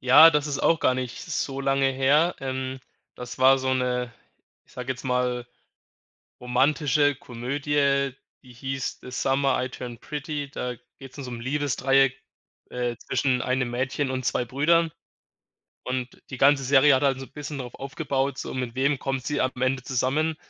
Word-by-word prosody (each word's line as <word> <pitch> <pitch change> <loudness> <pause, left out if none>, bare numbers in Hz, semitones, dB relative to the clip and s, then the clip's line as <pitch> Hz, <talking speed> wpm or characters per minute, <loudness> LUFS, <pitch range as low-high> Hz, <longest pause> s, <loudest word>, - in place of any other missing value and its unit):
Ja, 130 +6 +9
das 150 -1 +1
ist 140 -2 -2
auch 165 - +3
gar 130 - +2
nicht 125 -1 -4
so 135 -1 -3
lange 135 0 +2
her. 140 +6 +3
Ähm, 130 0 -4 0.4
das 125 0 -8
war 135 +1 +6
so 130 0 0
'ne, 125 -1 -1 0.5
ich - - -24
sage 125 +1 -3
jetzt 125 - -11
mal, 125 -1 0 1.0
romantische 145 +3 +2
Komödie, 140 +2 0 0.3
die 125 -2 -15
hieß 135 +2 -4
„The 125 - -10
Summer 135 -1 +1
I - - -4
Turned 120 -2 -8
Pretty“, 145 -1 -4
da 125 -3 -4 0.2
geht's 135 +1 -12
um 140 - -5
so 125 - -6
'n 120 -1 -6
Liebesdreieck, 135 0 +1 0.5
äh, 120 -1 -2
zwischen 125 -2 0
einem 125 -1 0
Mädchen 130 +3 -1
und 130 -1 -3
2 125 - 0
Brüdern 160 +7 +2 0.9
und 125 0 -4
die 130 - -6
ganze 140 +1 +4
Serie 140 +2 +5
hat 130 - +3
halt 135 -2 +2
so 135 - -6
'n - - -22
bisschen 145 0 -6
drauf 125 -2 -7
aufgebaut, 135 -1 -2
so: - - -5
Mit 125 -2 -4
wem 140 +1 +1
kommt 135 -3 -3
sie 145 - 0
am 130 - +1
Ende 130 0 +1
zusammen? 135 +6 0
135 Hz, 175 wpm, -25 LUFS, 125-140 Hz, 1.0 s, Ja